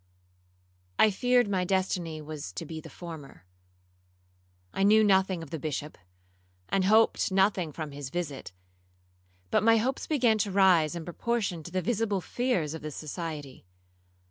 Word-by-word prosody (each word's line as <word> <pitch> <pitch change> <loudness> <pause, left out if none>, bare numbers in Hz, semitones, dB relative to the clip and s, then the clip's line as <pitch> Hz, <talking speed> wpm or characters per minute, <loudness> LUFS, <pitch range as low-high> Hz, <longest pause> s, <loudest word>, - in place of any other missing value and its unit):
'I 215 - +5
feared 245 +3 +2
my 190 -2 0
destiny 180 -4 -1
was 150 -9 -7
to 85 - -5
be 160 -1 -7
the - - -11
former. 155 - -10 1.3
I - - -2
knew 215 +2 +6
nothing 190 -4 +2
of 165 - -12
the 160 - -4
Bishop, 150 0 -4 0.7
and 195 -1 +1
hoped 220 0 +3
nothing 190 -4 +2
from 155 0 -6
his 140 -2 -7
visit; 150 - -5 1.0
but - - +3
my 225 +1 +5
hopes 255 +5 -1
began 240 -8 +2
to 205 - 0
rise 185 -5 +4
in 170 -2 -6
proportion 195 -1 -2
to 175 - -10
the 185 0 -1
visible 210 -1 0
fears 185 - -1
of 160 - -7
the 155 - -5
society. 150 - -7
180 Hz, 150 wpm, -28 LUFS, 155-205 Hz, 1.3 s, knew